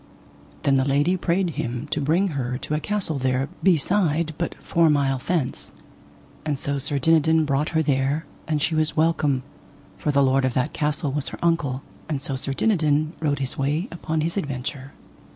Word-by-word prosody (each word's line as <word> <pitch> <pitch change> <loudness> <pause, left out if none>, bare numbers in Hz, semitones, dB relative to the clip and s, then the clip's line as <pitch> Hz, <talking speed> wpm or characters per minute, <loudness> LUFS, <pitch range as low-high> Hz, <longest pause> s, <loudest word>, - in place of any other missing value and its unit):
Then 140 -1 +4
the 130 - +3
lady 145 +6 +2
prayed 180 0 0
him 120 -2 -3
to 150 - 0
bring 170 +7 +2
her 125 -5 -2
to 150 - -4
a 150 - +1
castle 185 -5 -1
there 130 +1 0
beside 170 -2 +2
but 170 - -2
four 165 -1 +3
mile 140 -3 +2
thence; 155 -2 -2 0.7
and 150 -2 -1
so 140 +1 -2
Sir 145 +1 -1
Dinadan 160 +2 +4
brought 145 +1 0
her 160 - +3
there, 140 +2 +1 0.2
and 150 -2 0
she 160 - +1
was 155 0 +1
welcome, 155 -5 +2 0.6
for - - -2
the 140 -1 +4
lord 135 0 +3
of 130 -2 0
that 130 +4 0
castle 150 -1 -1
was 145 0 -2
her - - -7
uncle; 145 -6 +1 0.3
and 150 -3 -1
so 135 0 -3
Sir 135 +1 -3
Dinadan 155 -4 +2
rode 145 -3 0
his 135 -1 -4
way 150 +8 0
upon 160 -2 -2
his 165 +5 -2
adventure. 140 -3 -4
150 Hz, 185 wpm, -24 LUFS, 135-160 Hz, 0.7 s, Then